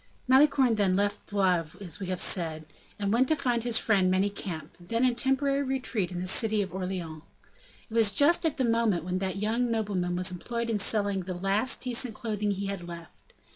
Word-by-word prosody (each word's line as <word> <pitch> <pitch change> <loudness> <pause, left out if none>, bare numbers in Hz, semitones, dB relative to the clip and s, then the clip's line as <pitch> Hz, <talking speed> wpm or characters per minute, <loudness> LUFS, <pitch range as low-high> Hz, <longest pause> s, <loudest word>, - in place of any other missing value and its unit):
Malicorne, 265 -2 +4
then, 195 -3 +2
left 205 +1 -1
Blois, 180 -6 0
as 175 -6 -5
we 190 - -5
have 185 -1 -3
said, 160 -3 -1 0.3
and 200 0 -1
went 255 +3 +3
to 315 - +2
find 245 -5 0
his 235 -2 +3
friend, 195 -6 +2
Manicamp, 190 -3 -2
then 230 +8 0
in 250 - +3
temporary 275 +3 +1
retreat 255 -8 -1
in 175 - -4
the 185 - -4
city 215 +1 +2
of 190 - -9
Orleans. 180 -4 -5 0.7
It 220 - -14
was 225 -3 +4
just 290 - +4
at 320 -3 0
the 260 - +1
moment 230 -7 +1
when 180 +1 -2
that 190 0 -2
young 225 +4 0
nobleman 200 -6 -1
was 185 +1 +1
employed 235 +6 -4
in 215 - 0
selling 200 -1 +1
the 185 0 -5
last 195 +7 0
decent 245 -2 -1
clothing 210 -4 -2
he 200 0 -2
had 195 -3 -5
left. 165 -13 -12
205 Hz, 200 wpm, -28 LUFS, 185-235 Hz, 0.7 s, Malicorne